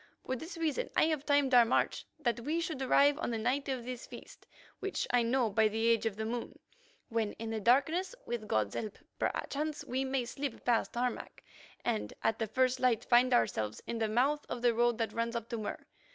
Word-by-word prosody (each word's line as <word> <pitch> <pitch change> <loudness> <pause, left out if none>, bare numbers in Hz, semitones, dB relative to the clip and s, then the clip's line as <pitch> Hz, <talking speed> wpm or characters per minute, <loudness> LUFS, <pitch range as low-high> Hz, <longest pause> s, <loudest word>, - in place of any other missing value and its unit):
For 260 - -1
this 325 +7 -7
reason 330 +9 -1
I - - +6
have 305 -3 -2
timed 285 -2 +3
our 245 -1 +9
march 230 - 0
that 240 -6 -1
we 300 +8 -1
should 320 -5 -3
arrive 285 +3 +4
on 335 - -2
the 230 - -1
night 255 +6 -1
of 255 -3 -3
this 250 -1 -6
feast, - - -12 0.3
which 390 0 -2
I 245 - +4
know 235 -1 +1
by 220 +2 +4
the 220 +2 -1
age 230 -1 +3
of 215 - -3
the 220 +1 -3
moon, 235 +1 -4 0.5
when, 225 -2 -1
in 225 0 -6
the 220 - -2
darkness, 315 - +2
with 235 -3 -4
God's 105 - 0
help, 215 -2 -4 0.2
perchance 300 +1 -2
we 260 0 -1
may 265 -2 -1
slip 275 +1 -5
past 240 -1 +1
Harmac, 245 0 -3 0.4
and 230 -3 -1
at 225 - +1
the 225 - -1
first 255 +3 +1
light 250 -4 +2
find 250 +1 +5
ourselves 110 - +1
in 235 - -3
the 220 -1 0
mouth 275 +7 +2
of 240 - -4
the 240 -1 +4
road 240 0 +2
that 225 -2 -2
runs 230 +1 -1
up 235 -1 -4
to 235 - -3
Mur. 215 - -5
240 Hz, 215 wpm, -32 LUFS, 225-275 Hz, 0.5 s, our